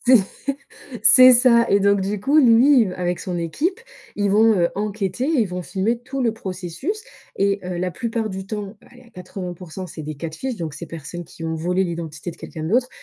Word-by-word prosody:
C 255 0 +6 0.9
c'est 255 +3 +9
ça. 235 -1 +5
Et 200 0 +4
donc, 200 0 +3
du 195 +1 -2
coup, 280 +8 +3
lui, 255 +1 +6
il 215 - 0
v 180 - -6
avec 180 -1 -2
son 180 -2 -4
équipe, 315 - -2 0.4
ils 205 -1 +1
vont, 220 +2 +5
heu, 170 -1 +3
enquêter 205 +2 -2
ils 285 -8 +2
vont 180 0 -4
filmer 210 +7 -1
tout 265 +2 -5
le 230 -2 +1
processus 195 - -5 0.3
et 200 0 +1
heu, 180 -1 -4
la 180 +1 -1
plupart 225 +5 -3
du 190 -1 -6
temps, 210 0 -6
allez, 245 - -17
à 240 - -20
80% 180 -2 -7 0.3
c'est 155 -1 -9
des 155 +1 -6
Catfish, 165 - -5
donc 160 -5 -5
ces 170 - -7
personnes 165 +2 -8
qui 165 - -11
ont 160 0 -2
volé 180 +4 0
l'identité 170 -1 -5
de - - -13
quelqu'un 155 -3 -8
d'autre, 240 +9 +1
195 Hz, 205 wpm, -21 LUFS, 175-235 Hz, 0.9 s, c'est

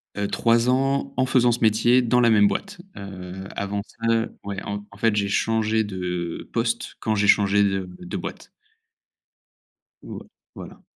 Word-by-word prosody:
Heu, 100 0 -1
3 115 +2 +2
ans 135 +2 +1
en 130 - +3
faisant 125 -2 +3
ce 120 - -1
métier 115 +3 +4
dans 125 0 +2
la 120 -1 +4
même 105 -1 +5
boîte, 195 - -4 0.2
heu, 95 -1 -8
avant 100 0 -2
ça, 115 - -6
heu, 115 0 0
ouais, 100 -1 -5
en 100 0 -5
en 100 - -16
fait, 110 0 +2
j'ai 100 -1 +1
changé 110 +1 +1
de 90 -4 -4
poste 115 0 -2
quand 110 - -1
j'ai 105 0 +1
changé 100 0 +4
de 95 -2 -1
de 180 - -6
boîte. - - -7 1.5
Ouais, - - -9 0.3
voilà. - - -11
110 Hz, 170 wpm, -23 LUFS, 100-120 Hz, 1.5 s, même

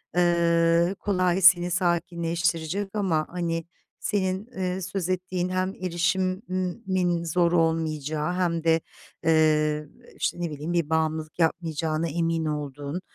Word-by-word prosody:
eee, 170 0 +3
kolay 185 -2 +1
seni 180 -1 +6
sakinleştirecek 170 +1 0
ama 175 -7 +1
hani, 165 -2 -2 0.3
senin, 190 -1 -1
eee, 185 0 -2
söz 190 -1 -3
ettiğin 185 0 -1
hem 185 +1 -1
erişimin 185 0 -1
zor 170 +1 +2
olmayacağı 160 -1 0
hem 170 -3 0
de, 165 -1 +3 0.4
ııı, 155 -2 +3 0.3
işte, 175 - -2
ne 170 - -1
bileyim, 150 +4 -4
bir 170 -3 0
bağımlılık 160 0 -1
yapmayacağına 160 -1 0
emin 165 +1 0
olduğun, 145 +2 -4
170 Hz, 115 wpm, -26 LUFS, 160-185 Hz, 0.4 s, seni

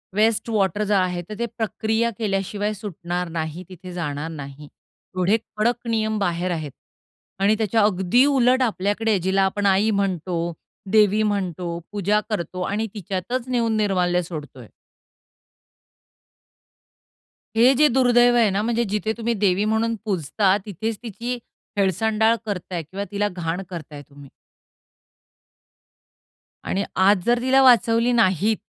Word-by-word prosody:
Waste 220 +2 +2
water 205 -1 +1
जो 205 - 0
आहे, 180 -2 0
तर 210 +4 -8
ते 235 - 0
प्रक्रिया 225 0 -1
केल्याशिवाय 205 0 -2
सुटणार 180 -3 -5
नाही, 160 +3 -4
तिथे 185 0 -10
जाणार 155 -2 -4
नाही. 145 -1 -9 0.5
एवढे 190 +5 +3 0.2
कडक 235 +2 0
नियम 220 -1 0
बाहेर 180 -2 -1
आहेत 155 -4 -4 0.7
आणि 210 +2 +4
त्याच्या 220 0 +1
अगदी 205 +5 +3
उलट 260 -2 +3
आपल्याकडे, 210 -1 +1
जिला 190 +2 +1
आपण 205 -1 -3
आई 200 +3 +3
म्हणतो, 175 -4 -1 0.4
देवी 215 0 +4
म्हणतो, 180 -4 -2
पूजा 205 +1 +1
करतो 185 -3 -3
आणि 210 +4 -1
तिच्यातच 210 +5 -4
नेऊन 235 -3 0
निर्माल्य 180 -4 +1
सोडतोय. 150 -8 -9 2.9
हे 250 +4 +6
जे 300 +3 +5
दुर्दैव 245 -2 +4
आहे 225 -3 +4
ना, 200 +2 0
म्हणजे 235 +1 +1
जिथे 215 +1 -1
तुम्ही 235 0 -1
देवी 200 -1 +1
म्हणून 230 +1 +1
पूजता, 190 +1 +1
तिथेच 215 +3 -4
तिची 240 +2 -4 0.4
हेळसांडाळ 220 +4 +2
करताय 180 -4 -4
किंवा 190 +6 -6
तिला 205 0 0
घाण 170 +1 -3
करताय 155 -5 -8
तुम्ही. 140 -1 -14 2.3
आणि 200 +1 -1
आज 190 -1 +4
जर 240 0 +3
तिला 265 +1 +4
वाचवली 235 -1 +4
नाहीत, 215 -2 +2
205 Hz, 130 wpm, -22 LUFS, 180-225 Hz, 2.9 s, हे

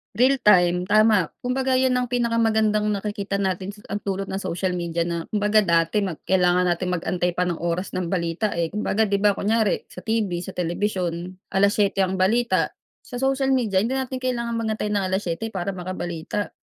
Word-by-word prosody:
Real 255 +5 +4
time. 180 -3 +5
Tama. 210 -2 +3
Kumbaga 260 +1 -1
yun 260 -1 +2
ang 250 -1 -1
pinakamagandang 225 -3 +2
nakikita 200 -1 -3
natin 190 0 -2
sa 205 - -16 0.2
ang 205 - -5
dulot 195 0 -2
ng 195 +1 -4
social 180 +1 -2
media 170 -1 -2
na 170 -1 -2
kumbaga 210 0 +3
dati 170 +3 +2
mag 180 -5 -4
kailangan 180 -1 +3
natin 180 +1 0
mag-antay 180 0 -1
pa 180 +1 -1
ng 175 - -1
oras 175 +2 -2
ng 180 -2 -2
balita, 175 +3 -1
eh. 170 -1 -1
Kumbaga 210 +3 0
'di 200 0 0
ba, 205 - +6
kunyari 215 +1 0
sa 180 - -11
TV 220 -1 0 0.2
sa 190 - -6
telebisyon, 180 -1 -2 0.2
7:00 200 0 +3
ang 190 0 -1
balita, 235 +6 +2 0.3
sa 250 - -11
social 270 0 +2
media 215 -7 +1
hindi 230 +7 0
natin 260 -1 -3
kailangan 240 -2 -2
mag-antay 220 -2 -2
ng 205 - +1
7:00 190 +1 -2
para 195 -3 -3
makabalita 180 +1 -4
200 Hz, 180 wpm, -23 LUFS, 180-220 Hz, 0.3 s, ba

